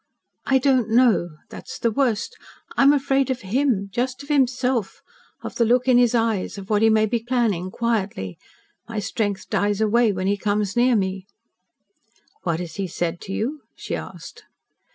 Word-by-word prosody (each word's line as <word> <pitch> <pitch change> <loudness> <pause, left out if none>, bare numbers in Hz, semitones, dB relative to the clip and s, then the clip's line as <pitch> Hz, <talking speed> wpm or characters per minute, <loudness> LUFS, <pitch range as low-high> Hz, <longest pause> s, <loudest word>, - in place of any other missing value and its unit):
"I 270 - +4
don't 255 -4 +2
know. 225 -7 +3 0.2
That - - -10
is - - -6
the 230 - 0
worst. 250 - 0 0.4
I - - +2
am 275 +1 +7
afraid 275 -2 +1
of 255 -1 -2
HIM 210 -1 0
just 255 +4 -2
of 280 - -14
himself 255 -5 0 0.4
of - - -6
the 235 - +3
look 245 +3 +2
in 250 -1 +6
his 245 -1 +3
eyes 225 -4 0
of 195 +1 -8
what 210 0 +3
he 225 - +5
may 220 0 +4
be 235 +2 -1
planning 225 -7 0
quietly. 195 - -2 0.5
My 225 - -5
strength 205 -1 -2
dies 205 0 +1
away 220 +1 +3
when 185 -1 -3
he 200 +1 +1
comes 205 0 -1
near 245 +1 +4
me." 190 -1 -2 1.1
"What 170 -3 -1
has 175 +1 -7
he 195 -1 -2
said 170 0 -3
to - - -8
you?" 265 +9 -3
she - - -4
asked. - - -9
225 Hz, 180 wpm, -23 LUFS, 200-250 Hz, 1.1 s, am